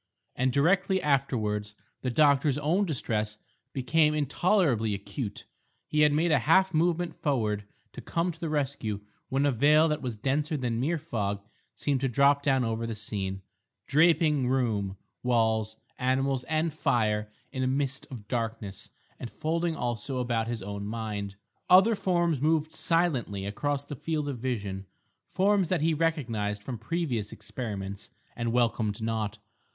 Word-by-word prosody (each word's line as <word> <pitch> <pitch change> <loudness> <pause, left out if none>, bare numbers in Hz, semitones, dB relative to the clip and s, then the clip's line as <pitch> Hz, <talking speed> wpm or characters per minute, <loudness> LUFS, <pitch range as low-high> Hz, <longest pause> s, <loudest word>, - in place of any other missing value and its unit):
And 130 0 +1
directly 180 +7 +3
afterwards 110 - 0 0.3
the 130 - -1
doctor's 140 +1 +4
own 165 +8 +2
distress 110 -7 -2 0.3
became 150 +3 +2
intolerably 145 - +2
acute. 100 +2 -6 0.4
He 150 - -1
had 150 -1 +6
made 160 +3 +2
a 150 - +5
half 190 +4 +4
movement 170 +2 +1
forward 110 -8 -1 0.3
to - - -8
come 170 +2 -1
to 165 - -15
the 165 - -3
rescue 135 -8 -2 0.3
when 135 +2 +1
a 145 - +3
veil 150 +6 +5
that 150 0 -1
was 125 -4 -3
denser 150 +7 0
than 120 -3 -1
mere 160 +7 +1
fog 100 -10 -3 0.3
seemed 140 -3 0
to 135 - +2
drop 140 +3 +4
down 135 -2 +2
over 115 0 -2
the 115 - -3
scene, 95 -3 -4 0.4
draping 150 -3 +4
room, 105 -7 0 0.2
walls, 110 -3 +1 0.2
animals 130 0 +1
and 155 0 0
fire 105 -7 +1 0.2
in 130 - -3
a 130 - +1
mist 140 +1 -1
of 115 -7 -9
darkness 110 -5 -4 0.3
and 120 - -6
folding 165 +4 -1
also 120 0 -3
about 120 -3 0
his 115 -4 -3
own 100 0 -5
mind. 105 -2 -4 0.3
Other 190 +5 +7
forms 175 - +1
moved 155 0 +1
silently 135 - 0
across 140 +7 -2
the 145 +1 -7
field 150 +2 -2
of 130 -4 -4
vision, 100 -6 -3 0.4
forms 195 -2 +2
that 180 -5 +1
he 160 +1 +3
recognised 120 -11 -1
from 120 0 -5
previous 120 - -2
experiments, 105 -3 -6 0.3
and 120 -1 -1
welcomed 115 -3 +1
not. 110 -1 -2
130 Hz, 150 wpm, -28 LUFS, 110-155 Hz, 0.4 s, Other